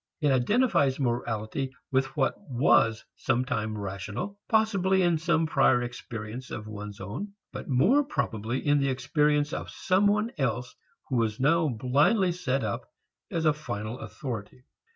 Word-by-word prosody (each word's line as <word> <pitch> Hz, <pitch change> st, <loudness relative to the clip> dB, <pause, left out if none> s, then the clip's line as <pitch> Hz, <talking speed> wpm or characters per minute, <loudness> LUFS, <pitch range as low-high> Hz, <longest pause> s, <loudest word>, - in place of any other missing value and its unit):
It 150 Hz, -3 st, +2 dB
identifies 140 Hz, -, +2 dB
morality 120 Hz, 0 st, -2 dB, 0.2 s
with 135 Hz, +1 st, 0 dB
what 135 Hz, -, +2 dB, 0.2 s
was 115 Hz, -3 st, +3 dB
sometime 115 Hz, -4 st, -1 dB
rational, 105 Hz, -, -5 dB
possibly 195 Hz, -4 st, +3 dB
in 170 Hz, -2 st, +2 dB
some 165 Hz, 0 st, +2 dB
prior 135 Hz, -5 st, +3 dB
experience 120 Hz, 0 st, -7 dB
of 110 Hz, -, -6 dB
one's 105 Hz, -1 st, -7 dB
own, 115 Hz, -, -6 dB, 0.2 s
but -, -, -6 dB
more 220 Hz, -, +4 dB
probably 120 Hz, -, -2 dB
in 145 Hz, 0 st, +4 dB
the 140 Hz, 0 st, +1 dB
experience 145 Hz, +3 st, +1 dB
of -, -, -4 dB
some 190 Hz, +2 st, +2 dB
one 210 Hz, +3 st, +1 dB
else 125 Hz, -1 st, -1 dB, 0.3 s
who 125 Hz, -4 st, +2 dB
is 110 Hz, -2 st, -1 dB
now 160 Hz, +4 st, +3 dB
blindly 145 Hz, -, +2 dB
set 135 Hz, -7 st, -1 dB
up 105 Hz, -2 st, -3 dB, 0.4 s
as 165 Hz, -1 st, -1 dB
a 155 Hz, -, +5 dB
final 120 Hz, -5 st, -5 dB
authority. 125 Hz, -3 st, -6 dB
135 Hz, 145 wpm, -28 LUFS, 115-165 Hz, 0.4 s, a